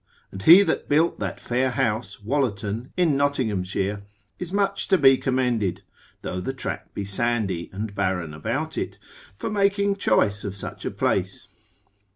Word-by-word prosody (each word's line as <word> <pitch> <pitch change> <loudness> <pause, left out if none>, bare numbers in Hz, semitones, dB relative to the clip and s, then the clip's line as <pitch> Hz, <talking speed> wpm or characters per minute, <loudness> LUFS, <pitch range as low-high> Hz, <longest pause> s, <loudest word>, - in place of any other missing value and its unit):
And 95 - -8
he 170 - +9
that - - -2
built 160 +4 +2
that - - -3
fair 125 +2 0
house, 115 -5 -1
Wollerton 115 -3 -1
in 170 -5 +3
Nottinghamshire, 105 -8 0 0.4
is 180 -1 -5
much 200 0 0
to 190 - +4
be 135 -4 +7
commended 125 -7 0 0.4
(though 90 - -3
the 135 - -3
tract 130 - -6
be 100 - -3
sandy 100 -4 -1
and 100 +2 -5
barren 95 -5 -1
about 125 - -3
it) - - -4 0.4
for - - -4
making 200 -1 +2
choice 105 - +2
of 100 -2 -4
such 100 - -6
a - - 0
place. - - -1
120 Hz, 155 wpm, -24 LUFS, 100-145 Hz, 0.4 s, he